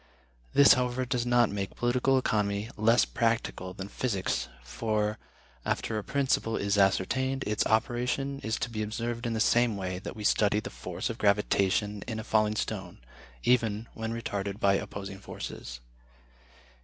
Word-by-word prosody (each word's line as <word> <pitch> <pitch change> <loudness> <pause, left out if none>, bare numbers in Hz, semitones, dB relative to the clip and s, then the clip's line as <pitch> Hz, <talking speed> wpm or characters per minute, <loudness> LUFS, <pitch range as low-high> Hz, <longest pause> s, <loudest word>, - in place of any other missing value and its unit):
This, 140 - +8
however, 125 0 0
does 125 -1 -1
not 120 -2 +4
make 100 -1 -4
political 125 +2 +2
economy 105 -3 0
less 115 - +4
practical 90 +8 -1
than 95 0 -6
physics, 100 -3 -1 0.2
for, 105 - -1 0.4
after 110 - -1
a - - -6
principle 130 -5 0
is 100 0 0
ascertained, 130 +7 +2
its 105 0 +1
operation 125 +5 0
is 110 -2 -2
to 130 -3 -2
be 110 -1 -3
observed 115 +3 -3
in 115 - -1
the 110 - -1
same 120 -1 +3
way 90 -1 -3
that - - -7
we 105 - -7
study 105 0 +3
the - - -7
force - - -4
of - - -8
gravitation 100 0 +2
in 110 -2 -3
a - - -5
falling 110 -1 +2
stone, 95 -4 -4 0.5
even 115 -3 +2
when 110 0 -4
retarded 100 -3 -3
by 100 -2 +4
opposing 95 0 -4
forces. - - -7
110 Hz, 155 wpm, -29 LUFS, 100-120 Hz, 0.5 s, This